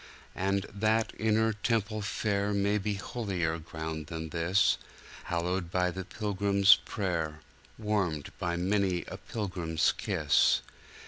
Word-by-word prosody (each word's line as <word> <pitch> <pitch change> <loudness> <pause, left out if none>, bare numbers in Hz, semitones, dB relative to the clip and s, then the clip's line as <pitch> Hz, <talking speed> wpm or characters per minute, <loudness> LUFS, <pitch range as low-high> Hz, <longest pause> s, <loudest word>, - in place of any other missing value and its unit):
And 100 +1 0
that 110 +2 +1
inner 110 0 +2
temple 110 0 -1
fair 100 0 0
May 100 +1 +2
be 105 +1 -1
holier 95 -6 -2
ground 80 -1 -5
than 80 0 -5
this, 85 +5 +2 0.5
Hallowed 85 +1 -1
by 90 0 +1
the 95 +2 -5
pilgrim's 100 -1 +4
prayer, 80 -6 -2 0.4
Warmed 100 -9 -1
by 85 -1 -1
many 95 0 +1
a - - -6
pilgrim's 90 -7 -1
kiss. - - +2
95 Hz, 120 wpm, -30 LUFS, 85-105 Hz, 0.5 s, pilgrim's